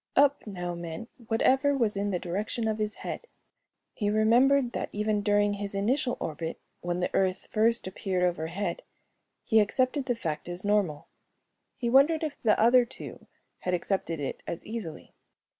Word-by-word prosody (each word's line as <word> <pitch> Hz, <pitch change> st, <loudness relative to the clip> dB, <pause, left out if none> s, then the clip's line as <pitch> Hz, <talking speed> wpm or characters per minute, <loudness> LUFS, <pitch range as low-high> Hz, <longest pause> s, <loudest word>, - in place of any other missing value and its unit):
"Up" 285 Hz, -3 st, +4 dB
now 180 Hz, -3 st, -4 dB
meant 170 Hz, +6 st, -7 dB, 0.2 s
whatever 270 Hz, +5 st, +3 dB
was 225 Hz, -5 st, +1 dB
in 200 Hz, +1 st, -1 dB
the 185 Hz, -, 0 dB
direction 205 Hz, +6 st, -2 dB
of 220 Hz, 0 st, -1 dB
his 215 Hz, 0 st, -1 dB
head. -, -, -5 dB, 0.7 s
He 205 Hz, -2 st, -1 dB
remembered 240 Hz, +5 st, +4 dB
that -, -, -3 dB
even 210 Hz, 0 st, 0 dB
during 205 Hz, 0 st, +3 dB
his 200 Hz, 0 st, -4 dB
initial 245 Hz, +5 st, +1 dB
orbit 160 Hz, +1 st, -4 dB, 0.2 s
when 175 Hz, 0 st, -2 dB
the -, -, -1 dB
Earth 190 Hz, -1 st, +1 dB
first 230 Hz, +2 st, +2 dB
appeared 185 Hz, -1 st, -2 dB
overhead 175 Hz, +2 st, -1 dB, 0.6 s
he 220 Hz, -, +4 dB
accepted 255 Hz, +6 st, +1 dB
the 245 Hz, -, +1 dB
fact 160 Hz, -6 st, -4 dB
as 175 Hz, +1 st, -5 dB
normal. 200 Hz, -8 st, +1 dB, 0.7 s
He 240 Hz, -, -2 dB
wondered 280 Hz, +6 st, +5 dB
if 305 Hz, -2 st, -4 dB
the 215 Hz, -3 st, +3 dB
other 245 Hz, +3 st, +6 dB
two 235 Hz, -, -10 dB, 0.3 s
had 180 Hz, 0 st, 0 dB
accepted 170 Hz, -3 st, -2 dB
it 140 Hz, -, -4 dB
as 170 Hz, -, -4 dB
easily. 215 Hz, -8 st, -6 dB
210 Hz, 160 wpm, -28 LUFS, 180-235 Hz, 0.7 s, other